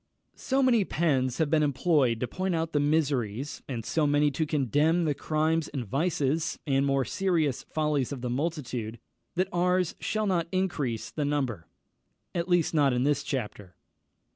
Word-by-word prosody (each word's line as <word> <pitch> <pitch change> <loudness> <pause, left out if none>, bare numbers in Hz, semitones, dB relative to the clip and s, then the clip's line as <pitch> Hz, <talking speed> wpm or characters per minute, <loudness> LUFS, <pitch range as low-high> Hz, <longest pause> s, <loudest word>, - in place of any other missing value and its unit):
So 270 +1 0
many 240 -5 +4
pens 135 -8 0
have 155 -2 0
been 160 -1 +4
employed 140 -4 +2
to 125 - 0
point 185 +6 -2
out 165 0 -2
the 145 - +3
miseries, 145 -5 0
and 115 -4 -4
so 155 -2 +1
many 145 0 +3
to 155 +3 -1
condemn 150 +4 +2
the 150 - +1
crimes 155 +2 0
and 135 -4 -4
vices, 155 - 0
and 135 -1 +2
more 135 -1 +1
serious 165 -7 0
follies 150 -4 -1
of 135 -3 -5
the 125 - -3
multitude, 125 -6 -3 0.4
that 185 +1 +1
ours 180 0 +1
shall 215 0 -1
not 175 -4 +1
increase 150 - -1
the 150 - -2
number, 135 - -2 0.7
at 170 +1 -2
least 175 -3 +2
in 135 -5 +3
this 145 0 +2
chapter. 105 - -5
150 Hz, 165 wpm, -28 LUFS, 130-165 Hz, 0.7 s, many